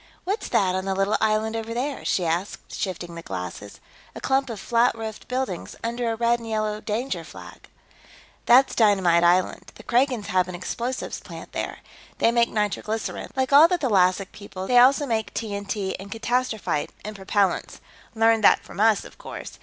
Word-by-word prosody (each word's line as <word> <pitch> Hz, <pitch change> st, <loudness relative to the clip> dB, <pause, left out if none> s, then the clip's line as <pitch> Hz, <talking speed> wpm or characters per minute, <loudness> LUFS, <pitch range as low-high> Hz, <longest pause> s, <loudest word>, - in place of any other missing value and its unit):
What's 400 Hz, +5 st, -3 dB
that, 185 Hz, -2 st, +2 dB
on 190 Hz, 0 st, -2 dB
the 195 Hz, 0 st, -1 dB
little 195 Hz, +2 st, +1 dB
island 220 Hz, +1 st, +1 dB
over 225 Hz, 0 st, -4 dB
there?" 270 Hz, +3 st, -3 dB
she 180 Hz, -, 0 dB
asked, 170 Hz, +4 st, -3 dB
shifting 175 Hz, -3 st, -4 dB
the 170 Hz, -, -7 dB
glasses. 95 Hz, -, -7 dB, 0.4 s
"A -, -, -6 dB
clump 270 Hz, 0 st, +1 dB
of 225 Hz, -3 st, -5 dB
flat 235 Hz, +4 st, +2 dB
roofed 220 Hz, -1 st, -7 dB
buildings. 250 Hz, -8 st, -3 dB
Under 235 Hz, 0 st, -1 dB
a -, -, -2 dB
red 235 Hz, +1 st, +2 dB
and 230 Hz, -1 st, -8 dB
yellow 215 Hz, -1 st, -1 dB
danger 235 Hz, +6 st, -3 dB
flag." -, -, -12 dB, 0.8 s
"That's 255 Hz, +3 st, +6 dB
Dynamite 190 Hz, -6 st, +4 dB
Island; 180 Hz, +2 st, +2 dB
the -, -, -13 dB
Kragans 245 Hz, -3 st, +1 dB
have 185 Hz, -1 st, +2 dB
an 180 Hz, -, -6 dB
explosives 235 Hz, +8 st, -4 dB
plant -, -, -10 dB
there. -, -, -4 dB, 0.4 s
They 230 Hz, -, +3 dB
make 235 Hz, 0 st, +3 dB
nitroglycerine, 215 Hz, +1 st, -2 dB
like 265 Hz, +1 st, 0 dB
all 300 Hz, +4 st, +9 dB
the 360 Hz, +1 st, +1 dB
thalassic 195 Hz, -, +2 dB
peoples; 190 Hz, -2 st, -8 dB
they 245 Hz, -1 st, +6 dB
also 270 Hz, +4 st, +5 dB
make 225 Hz, -4 st, -2 dB
TNT 200 Hz, -2 st, -3 dB
and 200 Hz, +1 st, -10 dB
catastrophite, 225 Hz, -8 st, -1 dB, 0.2 s
and 215 Hz, 0 st, -6 dB
propellants. 195 Hz, -1 st, 0 dB, 0.4 s
Learned 225 Hz, 0 st, +3 dB
that -, -, +5 dB
from -, -, -11 dB
us, 215 Hz, -1 st, +3 dB
of -, -, -14 dB
course. -, -, -9 dB
220 Hz, 175 wpm, -24 LUFS, 190-240 Hz, 0.8 s, all